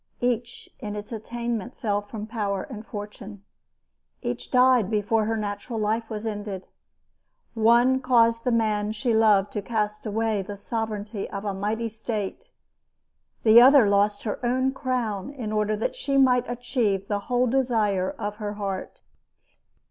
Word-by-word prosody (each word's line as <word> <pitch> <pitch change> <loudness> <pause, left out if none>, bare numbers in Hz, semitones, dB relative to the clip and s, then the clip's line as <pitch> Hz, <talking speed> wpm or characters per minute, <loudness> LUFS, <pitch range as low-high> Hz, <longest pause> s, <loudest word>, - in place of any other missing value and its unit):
Each, 240 -1 -2
in 210 -1 -5
its 210 +2 -7
attainment, 235 +1 -4
fell 205 -4 -1
from 210 +1 -7
power 205 -4 -2
and 220 -5 -8
fortune. 205 -1 -8 0.8
Each - - -4
died 250 -5 +4
before 215 0 +1
her 225 +1 -1
natural 210 +3 -4
life 220 +2 -1
was 215 0 -5
ended. 205 -3 -5 0.9
One 240 +3 +4
caused 230 -3 +3
the 250 - +1
man 215 -2 +1
she 235 +2 0
loved 210 -3 +4
to 210 - -3
cast 210 0 -2
away 220 -1 0
the 200 +1 -7
sovereignty 215 -1 -4
of 200 0 -6
a 200 - -1
mighty 215 +4 -2
state. 225 - -5 0.9
The 230 +1 +8
other 260 -3 +7
lost 205 +1 +2
her 220 +2 -4
own 260 +2 +1
crown 250 -6 -2
in 250 -7 -5
order 215 0 +1
that 220 - -2
she 280 - -1
might 250 -2 +4
achieve 230 -5 -1
the 205 -1 -1
whole 250 0 +3
desire 225 -7 +1
of 210 0 -5
her 210 -2 -4
heart. 195 -2 -5
220 Hz, 150 wpm, -25 LUFS, 205-240 Hz, 0.9 s, The